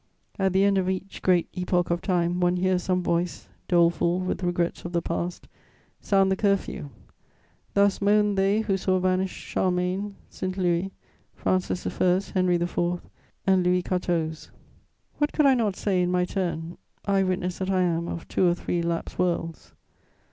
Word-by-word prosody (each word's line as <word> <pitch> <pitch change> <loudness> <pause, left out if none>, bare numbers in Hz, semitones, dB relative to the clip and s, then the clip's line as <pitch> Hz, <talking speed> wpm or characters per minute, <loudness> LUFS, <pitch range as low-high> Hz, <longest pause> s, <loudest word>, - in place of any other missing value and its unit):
At 190 -1 +2
the 190 +1 +4
end 200 -1 +3
of 185 0 0
each 190 +1 -4
great 180 -2 +3
epoch 180 -1 0
of 170 0 0
time, 175 -2 0
one 180 0 +2
hears 185 0 +1
some 180 0 0
voice, 170 0 -1 0.2
doleful 170 0 +3
with 185 +1 -2
regrets 175 -1 -1
of 175 - -6
the 170 - +1
past, 170 +1 -3 0.5
sound 195 -1 +2
the - - +3
curfew: 195 -7 -1 0.9
thus 200 -1 +3
moaned 210 0 +3
they 195 +3 +2
who 200 -3 0
saw 185 0 +1
vanish 185 +1 +1
Charlemagne, 185 +2 -1
St. 185 +1 -5
Louis, 180 0 +1 0.5
Francis 185 -1 -1
I., 180 0 +2
Henry 185 -2 +2
IV. 175 0 -1 0.5
and 190 -1 +4
Louis 180 0 +2
XIV. 170 -4 -2 0.7
What 295 0 +1
could 305 - +3
I 275 - +6
not 220 -6 +1
say, 190 -3 0
in 180 - +1
my 180 0 +2
turn, 175 -3 -3 0.3
eye 195 -1 +2
witness 185 -1 -1
that 190 0 -2
I 190 -1 +2
am 170 -1 0
of 165 - -6
two 185 - +2
or 175 - +3
three 175 0 -2
lapsed 170 0 -3
worlds? 170 -3 -2
180 Hz, 170 wpm, -26 LUFS, 175-190 Hz, 0.9 s, I